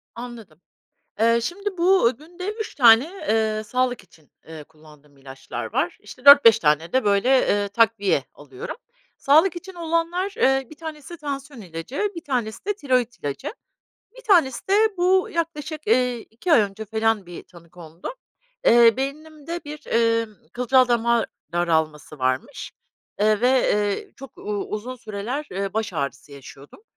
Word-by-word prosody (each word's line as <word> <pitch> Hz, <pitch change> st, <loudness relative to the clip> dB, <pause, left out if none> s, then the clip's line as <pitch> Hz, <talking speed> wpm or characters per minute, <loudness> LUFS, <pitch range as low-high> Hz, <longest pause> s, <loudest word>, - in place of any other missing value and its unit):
Anladım. 230 Hz, -9 st, -10 dB, 0.6 s
Eee, 230 Hz, +1 st, +4 dB
şimdi 395 Hz, -, -4 dB
bu, 360 Hz, -8 st, +4 dB
günde 355 Hz, +6 st, -7 dB
3 440 Hz, 0 st, -6 dB
tane, 235 Hz, -2 st, +7 dB, 0.2 s
eee, 220 Hz, -1 st, +1 dB
sağlık 250 Hz, 0 st, -1 dB
için, 160 Hz, -4 st, -24 dB, 0.2 s
eee, 155 Hz, -2 st, -9 dB
kullandığım 150 Hz, -2 st, -20 dB
ilaçlar 135 Hz, -1 st, -8 dB
var. -, -, -1 dB
İşte 255 Hz, -, -14 dB
4-5 280 Hz, -6 st, +9 dB
tane 155 Hz, -1 st, +1 dB
de 260 Hz, -2 st, +2 dB
böyle, 200 Hz, +4 st, +2 dB
eee, 205 Hz, -3 st, +1 dB
takviye 205 Hz, -, +2 dB
alıyorum. 135 Hz, -3 st, -9 dB, 0.4 s
Sağlık 315 Hz, +6 st, +4 dB
için 370 Hz, +1 st, -9 dB
olanlar, 335 Hz, +3 st, -1 dB
eee, 270 Hz, -, +2 dB
1 310 Hz, -, -12 dB
tanesi 315 Hz, +1 st, -8 dB
tansiyon 280 Hz, -4 st, -6 dB
ilacı, 195 Hz, -, -4 dB
1 335 Hz, -, -8 dB
tanesi 240 Hz, -6 st, -3 dB
de 415 Hz, +1 st, -1 dB
tiroit 255 Hz, -, -1 dB
ilacı, 145 Hz, -, -5 dB, 0.6 s
1 -, -, -13 dB
tanesi 340 Hz, -, +2 dB
de 390 Hz, -, +3 dB, 0.2 s
bu 370 Hz, +1 st, +2 dB
yaklaşık, 315 Hz, -1 st, -4 dB
eee, 250 Hz, -, +2 dB
2 240 Hz, +12 st, -4 dB
ay 245 Hz, -, +7 dB
önce 205 Hz, +1 st, -3 dB
falan 220 Hz, -2 st, 0 dB
bir 175 Hz, -1 st, -9 dB
tanı 170 Hz, -2 st, -18 dB
kondu. 170 Hz, -, -9 dB, 0.5 s
Eee, 235 Hz, -1 st, +6 dB
beynimde 310 Hz, +4 st, -5 dB
bir, 300 Hz, 0 st, -9 dB
emm, 230 Hz, -1 st, +1 dB, 0.2 s
kılcal 250 Hz, +1 st, +3 dB
dama 235 Hz, -1 st, +2 dB, 0.3 s
daralması 160 Hz, -3 st, -1 dB
varmış, 130 Hz, 0 st, -2 dB, 0.5 s
eee, 215 Hz, 0 st, +3 dB
ve, 245 Hz, -, +3 dB
eee, 210 Hz, -6 st, 0 dB
çok 270 Hz, -3 st, -13 dB
u -, -, -12 dB, 0.3 s
uzun 235 Hz, +5 st, -5 dB
süreler, 225 Hz, +6 st, -5 dB
eee, 195 Hz, +1 st, -3 dB
baş 220 Hz, -2 st, -2 dB
ağrısı 140 Hz, -2 st, -5 dB
yaşıyordum. 140 Hz, -, -14 dB
235 Hz, 150 wpm, -23 LUFS, 200-300 Hz, 0.6 s, 4-5